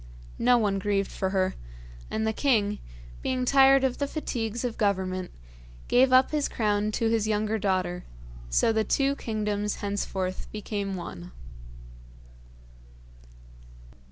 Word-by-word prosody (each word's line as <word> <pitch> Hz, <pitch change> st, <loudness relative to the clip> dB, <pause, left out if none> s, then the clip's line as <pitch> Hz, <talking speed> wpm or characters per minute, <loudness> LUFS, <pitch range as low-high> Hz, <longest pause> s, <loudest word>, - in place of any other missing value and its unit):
No 245 Hz, +1 st, +5 dB
one 205 Hz, -4 st, +1 dB
grieved 200 Hz, 0 st, 0 dB
for 190 Hz, -, -2 dB
her, 190 Hz, -1 st, +1 dB, 0.6 s
and 220 Hz, 0 st, -1 dB
the 220 Hz, -, 0 dB
king, 210 Hz, -6 st, +1 dB, 0.4 s
being 255 Hz, -1 st, -1 dB
tired 270 Hz, 0 st, +6 dB
of 260 Hz, -2 st, 0 dB
the 285 Hz, -, 0 dB
fatigues 235 Hz, -6 st, -3 dB
of 235 Hz, -2 st, -2 dB
Government, 185 Hz, -3 st, -1 dB, 0.6 s
gave 255 Hz, +1 st, +4 dB
up 255 Hz, +1 st, +5 dB
his 300 Hz, -2 st, 0 dB
crown 210 Hz, -1 st, 0 dB
to 225 Hz, -, +1 dB
his 220 Hz, -2 st, +1 dB
younger 215 Hz, +1 st, 0 dB
daughter; 185 Hz, -3 st, -1 dB, 0.5 s
so 140 Hz, -, +3 dB
the 220 Hz, 0 st, +2 dB
two 275 Hz, +4 st, +1 dB
kingdoms 210 Hz, -2 st, -2 dB
henceforth 195 Hz, -2 st, -3 dB
became 205 Hz, -2 st, -4 dB
one. 175 Hz, 0 st, -7 dB
210 Hz, 130 wpm, -27 LUFS, 195-245 Hz, 0.6 s, tired